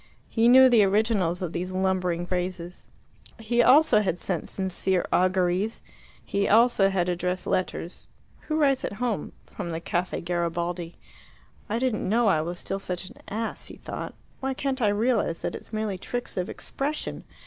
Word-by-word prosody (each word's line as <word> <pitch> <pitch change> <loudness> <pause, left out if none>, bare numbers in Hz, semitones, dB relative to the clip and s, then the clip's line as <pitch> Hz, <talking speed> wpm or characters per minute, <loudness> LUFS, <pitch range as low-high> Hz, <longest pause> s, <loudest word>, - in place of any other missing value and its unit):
He 230 0 +3
knew 260 +2 +9
the 235 -4 +5
originals 195 -3 +1
of 170 - -4
these 180 +2 -3
lumbering 185 -2 0
phrases; 180 -1 -4 0.5
he 235 +1 +1
also 260 -2 +6
had 190 -4 -1
sent 175 -2 -3
"sincere 190 -1 -1
auguries"; 185 +3 +1 0.4
he 200 0 0
also 220 -2 +5
had 185 -2 0
addressed 180 +1 -1
letters 180 -1 -2 0.4
who 310 - 0
writes 275 -4 +3
at - - -3
home? 230 0 -2
from 180 -4 -6
the 165 -1 -3
Caffe 175 +2 -2
Garibaldi. 170 0 -2 0.7
"I 220 - 0
didn't 240 -6 -1
know 235 +3 +3
I 160 -7 +3
was 175 +3 -4
still 195 +2 -4
such 185 -1 -5
an - - -16
ass," 225 +2 -4
he - - -10
thought. - - -7 0.2
"Why 265 0 -2
can't 270 -1 -2
I 215 - +4
realize 210 -5 +1
that - - -2
it's - - -9
merely 215 -4 -2
tricks 245 +5 -5
of 180 -1 -2
expression? 290 +3 -4
195 Hz, 165 wpm, -26 LUFS, 180-230 Hz, 0.7 s, knew